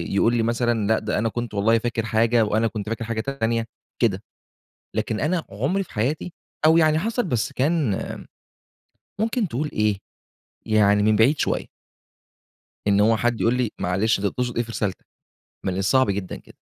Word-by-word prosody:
يقول 115 +4 +3
لي 115 - +2
مثلًا، 115 -2 0
لأ 110 - +3
ده 110 0 -2
أنا 115 +1 +1
كنت 120 -1 -5
والله 110 +3 +3
فاكر 115 -1 -2
حاجة 115 +1 +3
وأنا 110 +2 +1
كنت 110 -2 -5
فاكر 115 0 -3
حاجة 115 -1 -2
تانية، 115 -3 -1 0.4
كده، 105 -4 +1 0.7
لكن 110 - -1
أنا 165 +3 0
عمري 145 - -1
في - - -17
حياتي 140 +10 -2 0.3
أو 160 +1 +6
يعني 155 -1 +4
حصَلِت 230 +5 -1
بس 120 -7 -1
كان 140 - 0 1.2
ممكن 225 -1 0
تقول 150 +2 -3
إيه، 105 -2 +1 0.7
يعني 105 -1 +3
من 110 0 +4
بعيد 130 +8 +4
شويّة. - - -1 1.2
إن 100 0 +4
هو 110 +2 +4
حد 120 0 0
يقول 115 - +3
لي 125 -3 0
معلش 95 +6 +1
أنت 100 - 0
تقصُد 125 +1 -3
إيه 120 - +2
في 115 - -9
رسالتك؟ 100 -4 -3 0.6
من 95 -1 -1
الصعب 105 +4 +3
جدًا 100 -2 -3
كده. - - -16
115 Hz, 170 wpm, -23 LUFS, 105-130 Hz, 1.2 s, أو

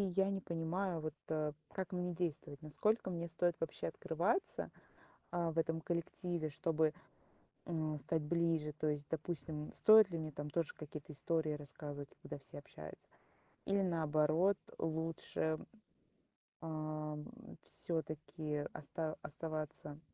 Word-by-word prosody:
я 195 0 +5
не 195 -1 +1
понимаю 170 +1 0
вот, 155 0 -3
э, 155 -1 +1 0.2
как 190 -2 -2
мне 180 0 0
действовать, 160 -4 -2
насколько 190 +8 +2
мне 170 -1 -1
стоит 170 +1 +2
вообще 165 - -1
открываться, 180 - +1 0.6
а, 170 -2 +1
в 160 - -2
этом 165 0 +2
коллективе, 170 -1 -1
чтобы, 160 0 +3 0.7
м, 155 -3 0
стать 160 +3 +1
ближе. 165 -1 +2
То 155 +1 0
есть, 145 -1 0
допустим, 155 -1 -2
стоит 215 -2 +9
ли 170 - -1
мне 155 -1 -3
там 145 +1 -4
тоже 165 0 0
какие-то 150 0 -7
истории 160 +1 +1
рассказывать, 145 -1 -6
когда - - -5
все 140 - -10
общаются, 75 - -9 0.6
или, 195 0 +4
наоборот, 165 +2 +4 0.2
лучше, 160 -1 0 1.0
ам, 155 -2 -2 0.4
всё-таки 155 -2 -2
оста 155 +1 -3
оставаться 155 -1 -4
160 Hz, 125 wpm, -38 LUFS, 150-170 Hz, 1.0 s, стоит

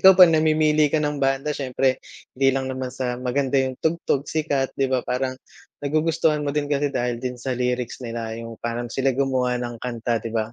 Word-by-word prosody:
ikaw 190 0 +9
pa 180 -2 +8
namimili 155 -2 +3
ka 155 - +3
ng 150 -1 -1
banda 135 +2 0
siyempre 130 -1 0 0.3
hindi 135 +1 +4
lang 130 0 -1
naman 130 -1 -4
sa 125 -2 -2
maganda 130 +2 0
yung 130 -1 -3
tugtog 160 -3 0
sikat, 145 -4 -1
di 135 - +2
ba? 130 - +3
Parang 130 +1 -1 0.5
nagugustuhan 155 +1 +1
mo 145 - -1
din 145 -1 -1
kasi 145 -1 0
dahil 120 -1 -1
din 125 0 -5
sa 130 -1 -2
lyrics 125 0 -2
nila 115 -1 -4
yung 115 -1 -8
parang 120 0 -3
sila 135 -1 +1
gumawa 130 -2 +1
ng 120 -1 -5
kanta 120 -2 -2
,di 115 - -5
ba? 110 0 -1
130 Hz, 200 wpm, -23 LUFS, 125-145 Hz, 0.5 s, ikaw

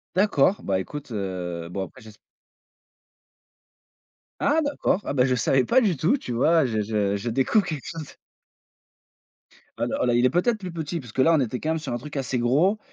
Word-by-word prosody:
D'accord, 190 -2 +3
bah, 95 - 0
écoute 145 +7 -8
heu, 90 -4 -4
bon 95 0 -3
après 130 - -16
j'esp 110 -1 -14 2.3
Ah 300 +3 +3
d'accord, 285 -8 0
ah - - -2
bah 130 -3 +3
je 130 -1 +1
savais 130 +3 +2
pas 260 +2 +4
du 200 -7 +2
tout, 170 - +2
tu 125 - -7
vois, 155 +7 +3
je 110 -4 -1
je 105 -1 0
je 100 +4 -3
découvre 135 - +2
quelque 155 -7 -5
chose. 160 -3 -7 1.6
Alors - - -1
là, 120 - +2
il 120 +1 +3
est - - +5
peut-être 180 - +1
plus 185 -3 -6
petit, 165 0 -4
parce 125 -5 -11
que - - +1
là, 165 +5 +5
on 160 - +4
était 125 -1 -1
quand 155 - -3
même 160 0 0
sur 140 -5 -5
un - - -1
truc 145 +4 -8
assez 130 -1 -2
gros. 145 - +2
135 Hz, 200 wpm, -24 LUFS, 115-170 Hz, 2.3 s, est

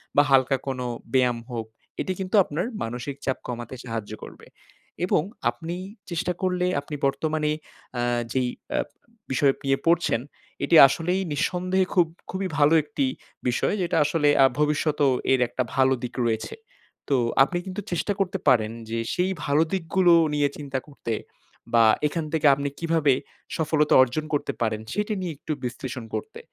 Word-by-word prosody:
বা 145 - +7
হালকা 135 0 +4
কোনো 130 -2 -2 0.3
ব্যায়াম 125 -2 +3
হোক, 115 -2 -3 0.4
এটি - - -2
কিন্তু 190 +2 -2
আপনার 165 +1 -3 0.2
মানসিক 120 +4 -4
চাপ 130 - 0
কমাতে 120 +1 -5
সাহায্য 115 -3 -5
করবে। - - -11 0.6
এবং 180 - +2 0.3
আপনি 160 +9 -5 0.3
চেষ্টা 175 +1 -1
করলে 180 -1 +1 0.2
আপনি 150 +1 -7
বর্তমানে 150 +2 0 0.5
আ - - +1 0.3
যেই 130 -1 +1 0.3
আ - - +2 0.5
বিষয় 135 +1 +3
নিয়ে 135 0 +2
পড়ছেন, 165 -8 +3 0.4
এটি 170 - +3
আসলেই 170 +7 -1
নিঃসন্দেহে 180 +4 +1
খুব 175 -3 +4 0.2
খুবই 190 +1 -2
ভালো 145 +2 +5
একটি 145 -2 -1 0.4
বিষয় 125 - +1
যেটা 175 -2 0
আসলে 150 -1 +2
আ - - +8
ভবিষ্যতেও 150 -1 +2 0.2
এর 130 - +4
একটা 130 +2 -2
ভালো 130 0 +4
দিক 125 - -4
রয়েছে। 110 -1 -2 0.5
তো 140 - +3 0.3
আপনি 175 +6 -1
কিন্তু 190 +1 -5
চেষ্টা 175 +4 0
করতে 190 -1 0
পারেন 110 -3 +3 0.2
যে 115 +1 -2
সেই 180 +2 +1
ভালো 145 +2 +3
দিকগুলো 180 0 +3 0.2
নিয়ে 145 -1 +2
চিন্তা 140 -2 -3
করতে। 140 -5 -5 0.6
বা 115 -1 +6 0.2
এখান 160 +2 -3
থেকে 155 -2 +3
আপনি 140 +1 -2
কীভাবে 165 -4 +2 0.4
সফলতা 155 -1 +2
অর্জন 130 +5 -2
করতে 145 - 0
পারেন 110 -2 0
সেটি 210 +1 -1
নিয়ে 175 -3 -3
একটু 155 - -6
বিশ্লেষণ 125 0 -5
করতে। 445 +1 -6
145 Hz, 155 wpm, -25 LUFS, 130-170 Hz, 0.6 s, আ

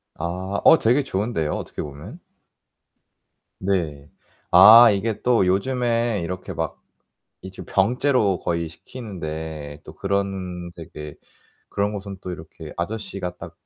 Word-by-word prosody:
아. 90 +4 -3
어, 165 - +7
되게 125 +6 +3
좋은데요 100 - -2
어떻게 - - -5
보면. 75 - -9 1.4
네. 85 -7 -2 0.4
아 115 +2 +10
이게 105 +2 -2
또 120 -6 +3
요즘에 115 +2 +1
이렇게 90 +2 -5
막 - - -4 0.6
이제 95 0 -9
병째로 110 -1 +2
거의 85 -1 -2
시키는데 80 - -7
또 75 - -12
그런 95 -3 -3
되게 75 -3 -9 0.5
그런 100 +1 -1
곳은 100 -1 -6
또 90 - -5
이렇게 80 -2 -9
아저씨가 95 -1 -4
딱 - - -10
95 Hz, 235 characters per minute, -23 LUFS, 85-110 Hz, 1.4 s, 아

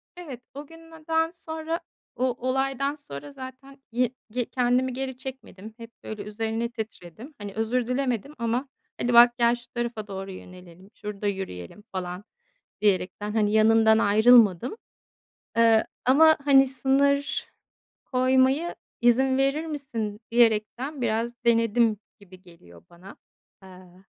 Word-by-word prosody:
Evet, 295 -9 -9
o 285 +1 -9
gün 330 +1 -15
neden 325 0 -1
sonra 325 -1 -5 0.4
o 255 -1 0
olaydan 270 +2 0
sonra 145 - -10
zaten 270 - -11
ye 245 +1 +1 0.2
ge 245 +1 -1
kendimi 250 +1 +1
geri 260 0 -4
çekmedim. 250 -6 -9
Hep, 230 -1 -11
böyle, 215 -1 -6
üzerine 225 +2 -3
titredim. 220 - -9
Hani, 205 -1 -8
özür 225 +3 -1
dilemedim 250 0 -2
ama 235 +4 -1 0.3
"Hadi, 240 0 0
bak, 240 +1 +7
gel, 235 0 +3
şu 240 -1 -15
tarafa 235 -3 -4
doğru 195 -1 -6
yönelelim. 180 0 -13
Şurada 210 0 -5
yürüyelim." 190 - -5
falan 180 0 -5 0.6
diyerekten, 205 0 0
hani, 210 -2 +2
yanından 220 0 +5
ayrılmadım. 220 - +5 0.8
Eee, 225 -1 +4 0.2
ama, 315 +5 +6
hani, 270 -1 +6
sınır 280 +2 +1 0.6
koymayı, 260 +5 +2 0.3
"İzin 260 +2 +3
verir 275 +4 +1
misin?" 235 -9 -5
diyerekten 240 +4 +1
biraz 235 +1 -2
denedim 230 -1 +3 0.2
gibi 185 -2 -16
geliyor 85 - -17
bana, 180 +3 -14 0.5
eee 185 0 -16
235 Hz, 125 wpm, -25 LUFS, 210-265 Hz, 0.8 s, bak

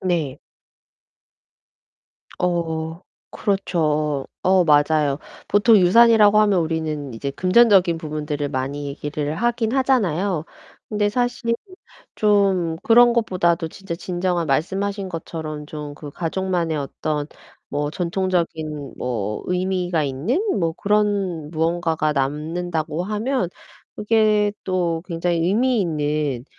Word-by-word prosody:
네. 170 -8 -1 2.0
어. 165 -2 -2 0.3
그렇죠. 155 -8 0 0.2
어 185 -1 +4
맞아요. 145 -2 +3 0.3
보통 210 +3 +5
유산이라고 210 +2 +6
하면 205 -4 +3
우리는 155 -4 -3
이제 140 +5 -4
금전적인 185 -1 +4
부분들을 150 -2 -3
많이 140 +1 -3
얘기를 145 +1 -4
하긴 230 +3 0
하잖아요. 195 - +1 0.4
근데 205 -1 0
사실 245 0 -1 0.6
좀 195 -6 +2
그런 240 +1 +6
것보다도 175 -8 +1
진짜 190 +1 -7
진정한 175 -1 -2
말씀하신 195 +7 -1
것처럼 160 -3 -6
좀 150 -1 -7
그 150 -1 -9
가족만의 170 0 -2
어떤 145 +1 -3 0.4
뭐 145 +1 -2
전통적인 170 -5 -2
뭐 105 -4 -3
의미가 180 -3 0
있는 145 - -1 0.2
뭐 165 -3 0
그런 200 -6 0
무언가가 165 -1 0
남는다고 155 +4 -2
하면 215 0 -1 0.5
그게 210 -1 +2
또 175 -3 -1
굉장히 170 -1 -1
의미 240 +4 +2
있는 150 -6 -1
170 Hz, 240 characters per minute, -22 LUFS, 150-200 Hz, 2.0 s, 유산이라고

